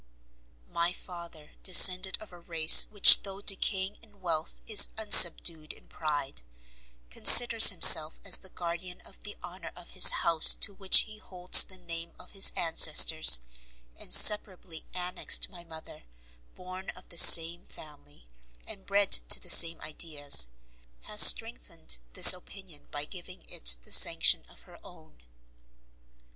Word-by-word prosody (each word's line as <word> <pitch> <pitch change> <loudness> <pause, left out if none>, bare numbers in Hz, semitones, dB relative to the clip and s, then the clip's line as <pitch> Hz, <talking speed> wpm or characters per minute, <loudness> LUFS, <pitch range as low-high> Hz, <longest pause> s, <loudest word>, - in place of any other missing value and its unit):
My 170 - -8
father, 170 -5 -16
descended 185 0 +1
of 215 - -18
a 175 - -20
race 165 -2 +1
which 205 -2 +3
though 195 -1 -14
decaying 195 -1 -6
in 210 -3 -27
wealth, 165 -4 -10
is 215 -2 +2
unsubdued 170 -6 +2
in - - -28
pride, 145 - -11 0.7
considers 230 - +5
himself 160 -4 +3
as 195 - +1
the 190 - -19
guardian 175 +1 -14
of - - -19
the 205 - -15
honour 175 0 -16
of 175 0 -19
his - - +3
house, 165 -2 -2
to 200 - -6
which 195 -1 +1
he 215 -1 -16
holds 180 -3 +1
the 190 - -17
name 170 -1 -13
of - - -19
his 195 -1 +1
ancestors 160 - +1 0.6
inseparably 180 - -1
annexed; 180 0 -4
my 175 -3 -17
mother, 160 - -19 0.5
born 185 +1 -17
of 185 - -19
the 170 - -6
same 170 +2 +3
family, 145 - -19 0.4
and 195 - -17
bred 200 0 -6 0.2
to - - +4
the 180 - -9
same 165 -1 +3
ideas, 145 - -1 0.5
has - - -2
strengthened - - -1
this - - +6
opinion 180 -3 -19
by 145 0 -11
giving 180 +2 -16
it - - -4
the - - -16
sanction - - 0
of - - -21
her - - -24
own. - - -25
175 Hz, 140 wpm, -21 LUFS, 160-190 Hz, 0.7 s, this